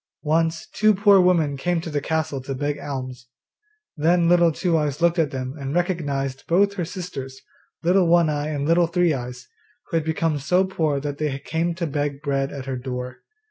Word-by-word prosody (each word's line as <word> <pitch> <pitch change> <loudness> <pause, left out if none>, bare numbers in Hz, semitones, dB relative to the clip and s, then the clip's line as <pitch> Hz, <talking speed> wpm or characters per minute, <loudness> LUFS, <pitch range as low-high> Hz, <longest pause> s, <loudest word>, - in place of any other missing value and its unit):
Once 165 +1 0
two 215 -1 +4
poor 200 -1 +6
women 170 -6 +2
came 175 +5 0
to 165 0 -6
the 145 -1 -1
castle 155 -3 -2
to 135 +1 -5
beg 145 +2 -2
alms. 130 -3 -6 0.7
Then 170 +2 +3
Little 170 -1 +5
Two 170 +2 0
eyes 150 -2 0
looked 170 0 +2
at 155 -3 +2
then 130 -1 -4
and 140 +2 -4
recognised 145 -7 -2
both 200 +4 +3
her 180 -4 -3
sisters, 135 -7 -7 0.4
Little 180 +1 +3
One 170 -1 +4
eye 150 -1 -1
and 145 -2 -2
Little 170 +1 +4
Three 170 -1 +2
eyes, 125 -1 -6 0.4
who 165 - +2
had 160 - 0
become 160 -1 0
so 180 +7 +2
poor 160 -6 -1
that 145 0 -5
they 150 -3 -1
came 165 +4 -2
to 170 0 -2
beg 145 -1 -3
bread 135 -1 -1
at 135 -2 -7
her 135 -1 -3
door. 125 0 -6
155 Hz, 195 wpm, -23 LUFS, 140-170 Hz, 0.7 s, poor